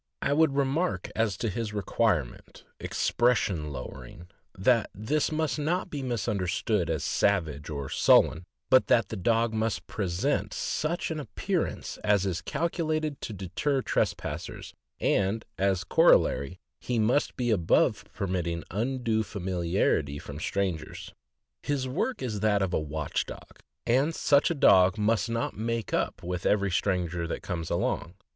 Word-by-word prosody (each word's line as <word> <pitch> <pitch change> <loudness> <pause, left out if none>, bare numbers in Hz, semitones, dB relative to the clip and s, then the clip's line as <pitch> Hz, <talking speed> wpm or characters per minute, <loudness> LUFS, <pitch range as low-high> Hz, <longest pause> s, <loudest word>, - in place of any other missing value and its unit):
I 140 - +2
would 155 -2 +3
remark 140 +6 0
as 110 -4 0
to 115 - -2
his 110 +1 -3
requirement 100 - -1 0.2
"expression 100 -11 +1
lowering," 85 +4 -9 0.3
that 115 +3 +3
this 140 +12 0
must 155 -1 -1
not 175 +5 -1
be 145 - -3
understood 105 -5 -1
as 80 -3 -1
savage 80 -7 0
or 70 -3 -4
sullen, 80 +5 +4 0.3
but 130 0 +6
that 115 - +3
the - - -4
dog 115 +3 +1
must 110 0 -1
present 100 +8 -1
such 165 +2 -2
an 155 - -3
appearance 180 +4 -3
as 105 -2 +3
is 95 -2 -2
calculated 155 -3 -2
to - - -5
deter 105 +9 -1
trespassers, - - -2 0.3
and 100 +3 +1
as 95 -2 +1
a - - -21
corollary, 75 +1 +3 0.2
he 125 - -2
must 115 +6 +2
be 120 -2 0
above 85 -6 +2
permitting 85 -3 -2
undue 115 +1 0
familiarity 90 -7 -1
from 70 0 -8
strangers. 90 -4 -3 0.5
His 140 -3 -1
work 175 - -2
is 110 -5 -2
that 105 -1 +2
of 95 - -1
the - - +1
watch 75 0 -3
dog, - - -11 0.3
and 135 +7 +2
such 140 -1 +3
a 170 - -1
dog 95 -8 +5
must 110 +2 +1
not 115 0 -2
make 115 +1 -3
up - - -1
with 90 +1 -2
every 100 -2 +2
stranger 90 -3 0
that - - -5
comes 85 -3 -4
along. - - -1
105 Hz, 145 wpm, -28 LUFS, 90-130 Hz, 0.5 s, but